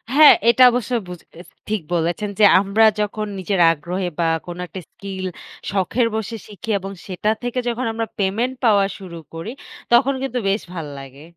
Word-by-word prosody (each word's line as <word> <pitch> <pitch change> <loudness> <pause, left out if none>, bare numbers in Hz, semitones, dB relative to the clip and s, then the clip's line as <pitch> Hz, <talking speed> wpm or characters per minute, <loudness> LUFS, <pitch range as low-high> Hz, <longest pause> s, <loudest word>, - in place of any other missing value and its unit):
হ্যাঁ। 305 0 +10 0.2
এটা 235 +2 +6
অবশ্যই 245 0 -1
বুজ 180 -1 -8 0.2
এস 180 - -12 0.2
ঠিক 215 -2 -1
বলেছেন 175 +5 -1
যে, - - +5 0.2
আমরা 200 +3 +3 0.2
যখন 210 +1 -2
নিজের 190 +1 -1
আগ্রহে 180 +4 -3
বা 170 - +2 0.2
কোন 175 0 -7
একটা 190 - -8
স্কিল, 195 -2 -7 0.5
শখের 205 +5 +1
বসে 220 +1 -3
শিখি 210 +1 -10
এবং 195 +1 -7 0.2
সেটা 190 +2 -2
থেকে 245 +1 -2
যখন 240 +1 -1
আমরা 225 0 -2
পেমেন্ট 225 +7 0
পাওয়া 205 -3 +5
শুরু 180 -3 -9 0.2
করি। 165 +7 -6 0.4
তখন 265 +3 +5
কিন্তু 255 -2 -2
বেশ 200 +3 0
ভাল 165 -4 -5
লাগে। 135 +1 -12
200 Hz, 175 wpm, -21 LUFS, 180-230 Hz, 0.5 s, হ্যাঁ